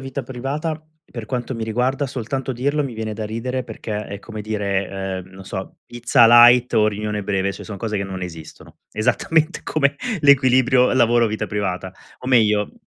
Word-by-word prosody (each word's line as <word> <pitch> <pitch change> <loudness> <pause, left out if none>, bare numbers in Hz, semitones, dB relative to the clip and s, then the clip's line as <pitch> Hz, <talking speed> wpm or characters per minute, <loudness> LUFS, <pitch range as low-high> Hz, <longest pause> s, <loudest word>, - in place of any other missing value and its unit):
vita 135 +1 -5
privata, 145 +6 -4 0.2
per 115 -3 -9
quanto 125 +3 -3
mi 115 - -5
riguarda, 125 +5 -1
soltanto 130 +1 -4
dirlo, 140 +5 0
mi 130 -4 -5
viene 110 -1 -4
da 110 0 -5
ridere, 125 +4 -3
perché 105 -1 -6
è 100 - -7
come 110 +1 -8
dire, 100 -2 -2 0.3
ehm, 95 0 -10
non 95 0 -12
so, 95 0 -7
pizza 120 -1 +3
light 120 +1 +7
o 110 -1 +4
riunione 105 0 -3
breve, 100 -1 -1
cioè - - -10
son 105 - -7
cose 105 +1 -3
che - - -1
non 95 -1 -6
esistono, 80 -4 -10
esattamente 140 +8 0
come 140 -3 0 0.2
l'equilibrio 130 -3 +4
lavoro 120 -2 +4
vita 110 0 -3
privata. 95 -3 -3 0.3
O - - -9
meglio 105 -5 +3
115 Hz, 175 wpm, -21 LUFS, 105-130 Hz, 0.3 s, light